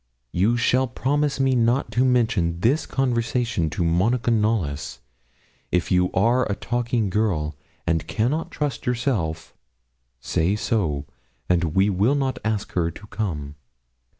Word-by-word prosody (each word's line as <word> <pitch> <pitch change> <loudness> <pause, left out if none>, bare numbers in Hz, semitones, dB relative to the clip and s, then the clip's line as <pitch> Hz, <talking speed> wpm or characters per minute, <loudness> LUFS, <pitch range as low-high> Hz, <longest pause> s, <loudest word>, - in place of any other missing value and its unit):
You 105 - +2
shall 130 +2 +2
promise 140 +3 0
me 135 -1 +3
not 120 0 +2
to 120 +4 +2
mention 110 -10 +1
this 135 - +2
conversation 120 - 0
to 85 +2 -2
Monica 110 +9 +2
Knollys. 95 - 0 0.7
If 90 -1 0
you 90 0 +3
are 120 +6 +3
a - - 0
talking 120 -3 -1
girl, 90 -8 0 0.3
and 80 -1 0
cannot 145 +10 -1
trust 145 -6 -3
yourself, 115 - -1 0.6
say 85 +10 0
so, 85 -10 -1 0.4
and 85 -3 +1
we 95 +2 +4
will 105 +9 +2
not 135 -2 -1
ask 110 -2 -2
her 85 -2 0
to 90 +5 -11
come. 75 -9 -3
110 Hz, 135 wpm, -23 LUFS, 85-125 Hz, 0.7 s, we